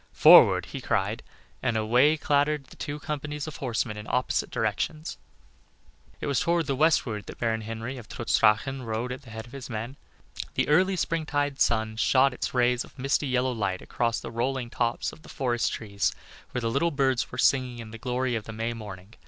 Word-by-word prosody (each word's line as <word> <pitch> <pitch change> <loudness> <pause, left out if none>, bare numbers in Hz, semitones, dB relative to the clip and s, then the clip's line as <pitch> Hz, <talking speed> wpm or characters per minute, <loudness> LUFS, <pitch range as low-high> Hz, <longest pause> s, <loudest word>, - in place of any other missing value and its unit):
"Forward!" - - +8
he - - -7
cried, - - 0 0.4
and 120 -3 0
away 125 +8 +4
clattered 145 0 +1
the - - -16
two 145 -1 -5
companies 150 0 -4
of 155 - -7
horsemen 115 -4 -2
in 105 0 -8
opposite 125 0 0
directions. 110 - -2 1.0
It - - -4
was 140 -2 +1
toward 170 -1 +1
the 135 - -1
westward 130 -8 +1
that - - -8
Baron 110 -1 0
Henry 115 +4 -5
of 110 - -13
Trutz 120 - 0
Drachen 115 +5 +3
rode 115 +2 -3
at 130 - -6
the 130 - -15
head 110 0 -7
of 120 - -15
his 135 -2 -8
men. 120 +4 -5 0.6
The - - +1
early 185 +6 +4
springtide 145 -5 -1
sun 110 -1 +2
shot 130 +3 +4
its - - -3
rays 125 -1 +2
of - - -17
misty, 135 +2 0
yellow 130 0 +1
light 100 -6 -2
across 115 -1 -1
the 115 - -7
rolling 120 +1 -2
tops 120 -1 -1
of - - -14
the - - -15
forest 120 -3 0
trees 100 -5 -1 0.4
where 125 - -3
the 115 -1 -1
little 155 +7 +2
birds 130 -4 0
were - - -7
singing 130 -3 +2
in 115 -2 -8
the 115 - -9
glory 125 +1 -1
of 110 -2 -2
the 115 - -7
May 115 +2 -2
morning. 105 -2 -9
125 Hz, 200 wpm, -27 LUFS, 115-140 Hz, 1.0 s, Forward